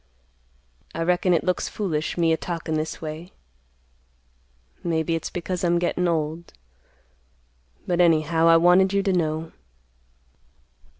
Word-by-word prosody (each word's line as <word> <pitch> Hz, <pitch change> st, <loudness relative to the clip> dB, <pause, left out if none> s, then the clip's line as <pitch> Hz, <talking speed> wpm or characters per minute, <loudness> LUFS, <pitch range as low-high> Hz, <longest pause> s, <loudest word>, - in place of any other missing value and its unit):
I 165 Hz, -, -1 dB
reckon 180 Hz, +1 st, +1 dB
it 170 Hz, -, +2 dB
looks 180 Hz, -1 st, -1 dB
foolish, 165 Hz, -7 st, -3 dB
me 165 Hz, -1 st, +3 dB
a -, -, +3 dB
talkin' 165 Hz, -2 st, -4 dB
this 155 Hz, +1 st, -3 dB
way. 160 Hz, +3 st, -7 dB, 1.5 s
Maybe 165 Hz, -1 st, -1 dB
it's 165 Hz, -, -3 dB
because 180 Hz, +1 st, -4 dB
I'm 175 Hz, -1 st, +2 dB
gettin' 175 Hz, +1 st, 0 dB
old, 165 Hz, 0 st, -2 dB, 1.3 s
but 175 Hz, 0 st, +1 dB
anyhow 165 Hz, -1 st, +3 dB
I 165 Hz, 0 st, +7 dB
wanted 180 Hz, +3 st, +4 dB
you 200 Hz, 0 st, +1 dB
to 195 Hz, -1 st, +1 dB
know." 160 Hz, -2 st, -1 dB
170 Hz, 125 wpm, -24 LUFS, 160-180 Hz, 1.5 s, I